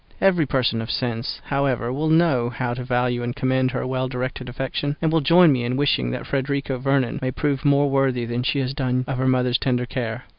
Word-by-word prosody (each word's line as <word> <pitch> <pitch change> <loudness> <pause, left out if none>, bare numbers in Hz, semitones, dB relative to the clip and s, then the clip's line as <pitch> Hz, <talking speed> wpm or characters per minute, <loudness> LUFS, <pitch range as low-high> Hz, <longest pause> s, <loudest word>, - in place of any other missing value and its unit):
Every 180 -6 +3
person 125 -4 0
of 115 - -6
sense, 120 -1 -3
however, 135 -4 -1
will 155 +4 -1
know 155 -7 +3
how 125 0 -3
to 125 +1 -5
value 125 -1 0
and 120 0 -3
commend 130 0 +1
her - - -3
well 130 0 -1
directed 125 0 -4
affection, 135 +3 -3
and 160 -1 +1
will 165 0 +2
join 170 +3 +6
me 125 -3 0
in 125 +2 -1
wishing 130 - +1
that - - -4
Frederica 140 -1 -2
Vernon 135 -2 0
may 130 - -1
prove 140 +1 -1
more 145 0 +3
worthy 135 -3 +1
than 120 +1 -2
she 135 +3 0
has 130 -1 -2
yet 135 - -11
done 130 -1 0
of 130 -2 -3
her 130 - +1
mother's 125 -1 +2
tender 125 -2 0
care. 120 -1 -4
130 Hz, 225 wpm, -22 LUFS, 125-140 Hz, -, join